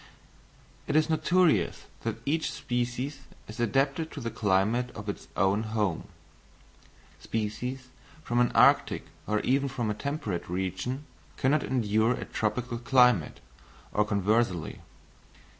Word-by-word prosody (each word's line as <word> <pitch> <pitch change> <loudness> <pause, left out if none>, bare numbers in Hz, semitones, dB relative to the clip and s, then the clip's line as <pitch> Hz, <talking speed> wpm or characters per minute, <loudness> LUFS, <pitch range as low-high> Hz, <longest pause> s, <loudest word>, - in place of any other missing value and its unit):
It 145 - -1
is 155 +1 +3
notorious 160 - +2 0.2
that 115 -2 -2
each 155 +3 0
species 125 +3 -3 0.3
is 110 - -9
adapted 135 +7 +1
to - - -6
the 115 -3 -4
climate 105 +5 +1
of 105 -1 -8
its 100 - -5
own 95 +3 +3
home: 105 -6 -1 1.1
species 125 +4 -4 0.3
from 120 -3 0
an 120 - +3
arctic - - +4 0.2
or 105 0 +1
even 140 +2 +1
from 120 -4 -2
a - - 0
temperate 105 - -4
region 95 - -3 0.3
cannot 145 +3 +2
endure 110 -1 +2
a - - -5
tropical 120 +2 -2
climate, 125 - +3 0.5
or 105 - +3
conversely. 100 -3 0
120 Hz, 125 wpm, -28 LUFS, 105-135 Hz, 1.1 s, arctic